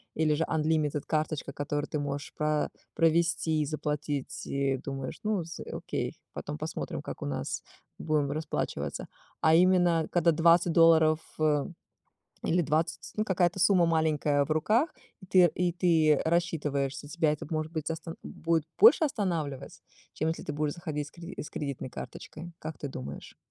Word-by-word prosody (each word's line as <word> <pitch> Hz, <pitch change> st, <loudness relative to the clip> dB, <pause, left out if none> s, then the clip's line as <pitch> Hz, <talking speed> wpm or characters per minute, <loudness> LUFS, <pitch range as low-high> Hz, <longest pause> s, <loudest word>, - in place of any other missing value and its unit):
или 155 Hz, -1 st, +2 dB
же 160 Hz, -, +1 dB
unlimited 155 Hz, -2 st, 0 dB
карточка, 155 Hz, -2 st, -1 dB
которую 145 Hz, +1 st, -2 dB
ты 150 Hz, -, -2 dB
можешь 145 Hz, 0 st, -4 dB
пра 150 Hz, 0 st, 0 dB, 0.3 s
провести 165 Hz, -1 st, +2 dB
и -, -, 0 dB
заплатить, 150 Hz, -1 st, -3 dB
и 140 Hz, -1 st, 0 dB
думаешь: 135 Hz, 0 st, -6 dB
"Ну, 210 Hz, -5 st, 0 dB
с 165 Hz, -, -9 dB
окей, -, -, -3 dB, 0.2 s
потом 75 Hz, -, -5 dB
посмотрим, -, -, -4 dB
как -, -, -7 dB
у -, -, -3 dB
нас 70 Hz, 0 st, -3 dB, 0.4 s
будем 150 Hz, -3 st, 0 dB
расплачиваться". 140 Hz, -, -3 dB, 0.3 s
А 160 Hz, 0 st, +5 dB
именно, 175 Hz, -2 st, +4 dB
когда 170 Hz, -1 st, +4 dB
20 170 Hz, +1 st, +4 dB
долларов, 160 Hz, -1 st, +6 dB, 0.2 s
э, 150 Hz, -2 st, +2 dB, 0.8 s
или 175 Hz, +1 st, +2 dB
20, 155 Hz, +2 st, -1 dB
ну, 215 Hz, -, +1 dB
какая-то 185 Hz, -2 st, +1 dB
сумма 185 Hz, -2 st, +5 dB
маленькая 155 Hz, -3 st, +2 dB
в -, -, -5 dB
руках, 215 Hz, -, +2 dB, 0.3 s
и -, -, -11 dB
ты 180 Hz, -2 st, +5 dB
и 180 Hz, -1 st, +1 dB
ты 160 Hz, -4 st, +3 dB
рассчитываешься, 150 Hz, -5 st, 0 dB
тебя 155 Hz, -1 st, +1 dB
это, 150 Hz, -, -4 dB
может 155 Hz, 0 st, -2 dB
быть, 155 Hz, -2 st, -3 dB
остан 165 Hz, +1 st, -6 dB
будет 165 Hz, -1 st, -1 dB
больше 420 Hz, -7 st, +8 dB
останавливать, 165 Hz, -, -3 dB, 0.3 s
чем 155 Hz, -, -1 dB
если 165 Hz, -, -4 dB
ты -, -, -4 dB
будешь 150 Hz, 0 st, -1 dB
заходить 150 Hz, -4 st, -4 dB
с -, -, -15 dB
креди 175 Hz, +2 st, -9 dB
с -, -, -8 dB
кредитной 140 Hz, -3 st, -4 dB
карточкой, 170 Hz, +6 st, -8 dB
как 155 Hz, -, -6 dB
ты 145 Hz, -, -4 dB
думаешь? 70 Hz, -, -8 dB
155 Hz, 160 wpm, -29 LUFS, 145-170 Hz, 0.8 s, больше